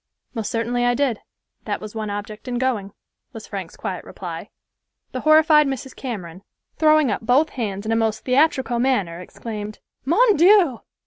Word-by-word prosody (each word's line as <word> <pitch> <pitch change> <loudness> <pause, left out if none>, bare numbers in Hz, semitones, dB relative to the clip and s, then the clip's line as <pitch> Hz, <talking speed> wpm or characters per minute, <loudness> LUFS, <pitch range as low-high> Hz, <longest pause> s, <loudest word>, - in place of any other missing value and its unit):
"Most 225 -4 -3
certainly 240 +1 -1
I 245 0 +3
did. 255 -5 0 0.5
That - - -2
was 215 -1 -8
one 215 -2 -4
object 205 +3 -6
in 245 -1 -2
going," 235 -6 -1 0.4
was - - -8
Frank's - - -7
quiet - - -4
reply. - - -7 0.6
The 255 - -4
horrified 310 0 +5
Mrs. 265 -1 -5
Cameron, 185 -9 -6 0.4
throwing 310 -5 +4
up - - -2
both 255 +7 +3
hands 205 -5 -4
in 220 - -1
a - - +3
most 220 -1 0
theatrical 265 -2 +2
manner, 205 -10 0
exclaimed, 210 +3 -7 0.3
"Mon 415 - +4
Dieu!" 345 - +5
245 Hz, 165 wpm, -22 LUFS, 215-280 Hz, 0.6 s, horrified